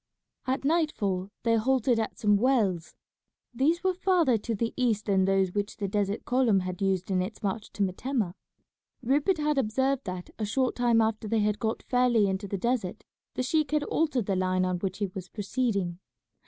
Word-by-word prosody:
At 265 Hz, +1 st, -1 dB
nightfall 215 Hz, -, 0 dB
they 230 Hz, -1 st, +3 dB
halted 245 Hz, 0 st, +2 dB
at 220 Hz, -, -3 dB
some 205 Hz, -1 st, +3 dB
wells. 200 Hz, -8 st, +1 dB, 0.6 s
These 315 Hz, +8 st, +1 dB
were 375 Hz, 0 st, +2 dB
farther 355 Hz, -8 st, +2 dB
to 225 Hz, +2 st, -3 dB
the 230 Hz, +2 st, -2 dB
east 230 Hz, -5 st, 0 dB
than 190 Hz, -2 st, +2 dB
those 195 Hz, -1 st, +2 dB
which 205 Hz, 0 st, -2 dB
the 200 Hz, -, -2 dB
desert 205 Hz, 0 st, -1 dB
column 245 Hz, -6 st, +3 dB
had 185 Hz, 0 st, -5 dB
used 190 Hz, -1 st, 0 dB
in 185 Hz, -1 st, +2 dB
its 205 Hz, +5 st, -6 dB
march 205 Hz, +2 st, -3 dB
to 205 Hz, -, 0 dB
Metemmeh. 200 Hz, +1 st, -1 dB, 0.7 s
Rupert 290 Hz, +9 st, +2 dB
had 300 Hz, -2 st, +1 dB
observed 265 Hz, +3 st, 0 dB
that 180 Hz, -2 st, -6 dB
a -, -, -1 dB
short 255 Hz, +4 st, 0 dB
time 240 Hz, -2 st, +3 dB
after 220 Hz, 0 st, -1 dB
they 220 Hz, +1 st, +1 dB
had 210 Hz, 0 st, 0 dB
got 220 Hz, -1 st, -2 dB
fairly 245 Hz, -4 st, +3 dB
into 195 Hz, +1 st, -2 dB
the 200 Hz, -, -3 dB
desert 225 Hz, -2 st, -2 dB, 0.3 s
the 255 Hz, -, -1 dB
sheik 305 Hz, +3 st, +1 dB
had 300 Hz, -1 st, +1 dB
altered 295 Hz, -8 st, 0 dB
the 195 Hz, -, 0 dB
line 185 Hz, 0 st, +1 dB
on 180 Hz, -1 st, -1 dB
which 190 Hz, 0 st, -3 dB
he 205 Hz, -, 0 dB
was 185 Hz, -1 st, -7 dB
proceeding. 200 Hz, -5 st, -2 dB
220 Hz, 190 wpm, -28 LUFS, 195-260 Hz, 0.7 s, they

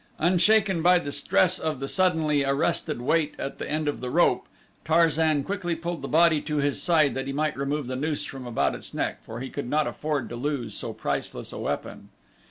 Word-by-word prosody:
Unshaken 185 Hz, +2 st, +3 dB
by 180 Hz, +2 st, +6 dB
the 145 Hz, -5 st, -3 dB
stress 185 Hz, +5 st, +2 dB
of 155 Hz, -4 st, -2 dB
the 135 Hz, -, -3 dB
suddenly 160 Hz, -5 st, +2 dB
arrested 140 Hz, 0 st, 0 dB
weight 155 Hz, +2 st, +1 dB
at 135 Hz, -, -5 dB
the -, -, -5 dB
end 155 Hz, 0 st, -1 dB
of 145 Hz, -, -2 dB
the 125 Hz, -, -3 dB
rope, -, -, +2 dB, 0.4 s
Tarzan 160 Hz, -2 st, +3 dB
quickly 185 Hz, -1 st, -2 dB
pulled 170 Hz, 0 st, -4 dB
the -, -, -4 dB
body 160 Hz, -1 st, +4 dB
to 150 Hz, 0 st, -3 dB
his 145 Hz, 0 st, 0 dB
side 155 Hz, -5 st, +3 dB
that 135 Hz, +1 st, -4 dB
he 135 Hz, -, -3 dB
might 155 Hz, +2 st, 0 dB
remove 140 Hz, +1 st, -2 dB
the 130 Hz, +1 st, -4 dB
noose 150 Hz, +3 st, -1 dB
from 130 Hz, -2 st, -7 dB
about 120 Hz, -, +1 dB
its -, -, -7 dB
neck, -, -, -2 dB
for 115 Hz, +2 st, -8 dB
he 130 Hz, -, -6 dB
could 140 Hz, -4 st, -5 dB
not 150 Hz, +2 st, +2 dB
afford 150 Hz, -3 st, -2 dB
to 120 Hz, -, -6 dB
lose 135 Hz, -1 st, -3 dB
so -, -, -4 dB
priceless -, -, -4 dB
a -, -, -6 dB
weapon. -, -, -4 dB
150 Hz, 210 wpm, -26 LUFS, 140-165 Hz, 0.4 s, by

